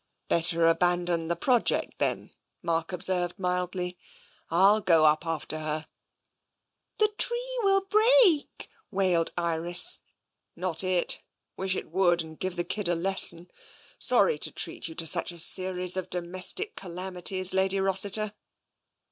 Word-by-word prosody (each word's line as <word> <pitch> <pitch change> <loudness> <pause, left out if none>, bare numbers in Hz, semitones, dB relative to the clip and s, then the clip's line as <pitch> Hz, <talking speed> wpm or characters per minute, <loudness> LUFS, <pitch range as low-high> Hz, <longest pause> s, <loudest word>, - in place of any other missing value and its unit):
" - - -49
Better 170 0 +4
abandon 175 0 +1
the 170 - 0
project, 245 +7 -1
then," - - -2 0.3
Mark 165 0 -2
observed 180 0 +1
mildly. 180 -1 -4 0.2
" - - -28
FU 195 +6 +3
go 165 -5 +3
up 155 +2 +2
after 155 -1 -3
her." 155 0 -4 1.1
The 430 -1 +2
tree - - -1
will 390 -2 +2
break," 430 -5 +2 0.2
wailed 185 -5 +1
Iris. 175 - 0 0.6
Not 175 -1 0
it! 185 -2 +2 0.3
Wish 190 0 -2
it - - -7
would, 175 -2 +1
and 160 -1 -14
give 185 -1 -4
the 175 - 0
kid 205 +1 -4
a 175 - 0
lesson. 175 -1 0 0.5
Sorry 480 - +3
to - - -1
treat - - -3
you 160 - -10
to 165 - -2
such 160 - +2
a 175 - -13
series 180 +1 +3
of 185 -1 -4
domestic 185 - -3
calami 180 0 -7
ties. 185 0 +3
Lady 190 +1 0
Rossiter." 200 +2 +1
180 Hz, 145 wpm, -26 LUFS, 170-195 Hz, 1.1 s, Better